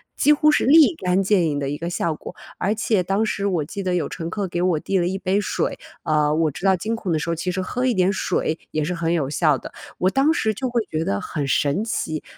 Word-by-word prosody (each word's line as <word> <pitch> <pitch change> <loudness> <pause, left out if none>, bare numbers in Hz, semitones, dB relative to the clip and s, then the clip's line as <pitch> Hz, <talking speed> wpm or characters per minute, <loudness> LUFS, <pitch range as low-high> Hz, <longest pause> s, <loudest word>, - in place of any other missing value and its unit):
几 300 - +4
乎 300 +1 +4
是 - - +2
立 315 +4 +6
竿 185 -5 +1
见 190 -3 +3
影 145 -2 -1
的 140 -1 -2
一 145 - -3
个 170 +2 -4
效 170 -2 -1
果。 - - -9 0.2
而 195 +3 0
且 220 -3 +1
当 195 +5 0
时 200 -2 -2
我 175 -6 0
记 200 +6 -6
得 180 -1 0
有 175 - 0
乘 165 -2 -5
客 200 +1 -3
给 175 0 -3
我 180 -4 +2
递 195 - -1
了 175 -1 +1
一 190 +2 -2
杯 195 +1 0
水， 200 - -2 0.3
呃， 150 -1 +2
我 155 0 +1
知 150 +7 -7
道 190 -1 +5
惊 220 +6 -2
恐 200 -6 -4
的 155 - +1
时 150 - -4
候 170 - 0
其 180 +3 -2
实 185 +1 -2
喝 250 +7 -2
一 250 - +2
点 185 0 +2
水 175 -4 -1
也 155 - -1
是 180 +4 -2
很 170 -1 -1
有 150 -6 0
效 150 -1 +2
的。 - - -10 0.2
我 185 - +2
当 270 +9 +3
时 220 -8 0
就 255 +5 -3
会 240 0 +1
觉 155 0 -1
得 100 -9 -1
很 145 +6 -4
神 145 +7 +1
奇。 155 -8 -3
180 Hz, 290 characters per minute, -22 LUFS, 160-205 Hz, 0.3 s, 立